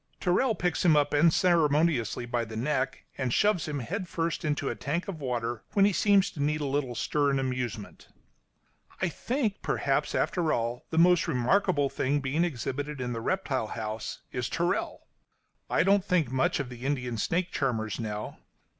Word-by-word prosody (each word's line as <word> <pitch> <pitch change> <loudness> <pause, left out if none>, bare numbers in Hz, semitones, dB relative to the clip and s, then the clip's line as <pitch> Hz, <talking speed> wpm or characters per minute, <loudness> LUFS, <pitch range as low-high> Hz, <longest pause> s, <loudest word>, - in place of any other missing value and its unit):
Tyrrell 215 +6 +2
picks 180 -2 -1
him 165 -4 +5
up 145 0 +2
unceremoniously 155 - +3
by 120 0 -1
the 110 -1 -8
neck 135 +2 -1
and 130 -2 0
shoves 205 - +2
him 150 -1 -3
head 180 - -4
first 165 0 -2
into 150 -2 -1
a - - 0
tank 160 +5 -3
of 175 -6 -6
water, 120 -3 -2
when 200 -1 +5
he 205 - +3
seems 200 0 +3
to 145 - -6
need 150 +2 +1
a 150 - -2
little 135 -3 -1
stir 145 +4 +1
and 135 -1 +1
amusement. 125 -5 -4 0.9
I 185 - +1
think, 230 - -2
perhaps, - - 0
after 170 -4 +1
all, 120 +1 -2
the 160 - -3
most 175 +1 +5
remarkable 145 +3 +2
being 140 +4 0
exhibited 145 -1 -3
in 125 -1 -2
the 115 - -4
reptile 135 - -1
house 110 0 -5
is - - -2
Tyrrell. - - -1 0.7
I - - +3
don't 195 +1 +4
think 170 -9 +1
much 130 +2 +1
of 140 -3 -3
the 125 -1 -10
Indian 125 -4 -2
snake 175 +8 0
charmers 110 -6 -1
now. 105 -2 -5
145 Hz, 170 wpm, -28 LUFS, 125-175 Hz, 0.9 s, him